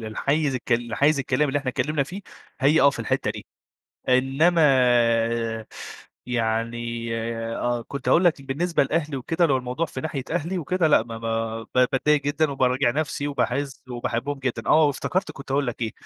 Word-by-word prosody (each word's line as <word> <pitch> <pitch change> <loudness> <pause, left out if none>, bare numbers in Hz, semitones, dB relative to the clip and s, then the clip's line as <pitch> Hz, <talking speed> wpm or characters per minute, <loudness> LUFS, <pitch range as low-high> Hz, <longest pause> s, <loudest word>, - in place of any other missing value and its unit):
للحييز 140 +6 -1
الك 125 -1 -2
للحيز 120 +5 +2
الكلام 140 +2 +1
اللي 140 +2 +1
إحنا 135 -2 -5
اتكلّمنا 150 +3 0
فيه، 180 +9 -7 0.4
هي 150 +4 +4
آه 140 - +6
في - - -9
الحتّة - - -1
دي، - - -8 0.6
إنّما 135 +7 +3 1.6
يعني 115 0 -2 0.5
آه. 120 -1 -1
كنت 140 -2 -6
هاقول 180 - +4
لك 160 -5 +3
بالنسبة 155 +6 0
لأهلي 150 0 -1
وكده 165 +7 +1
لو 140 -5 +2
الموضوع 125 +5 -2
في 130 - -7
ناحية 145 -3 -4
أهلي 175 +2 -2
وكده 180 0 +1
لأ، 145 -7 +4
ما 115 -1 -8
ما 115 0 -3
ب - - -19 0.2
باتضايق 150 +2 +2
جدًا 145 +1 0
وباراجع 130 -1 +2
نفسي 145 0 -2
وباحِس 135 0 -2
وباحبّهم 125 +3 -3
جدًا، 125 -4 -3
آه. 155 0 +6
وافتكرت 180 +6 -2
كنت 135 0 -10
هاقول 140 0 +1
لك 120 - -5
إيه، 110 -2 -1
135 Hz, 170 wpm, -24 LUFS, 120-150 Hz, 1.6 s, آه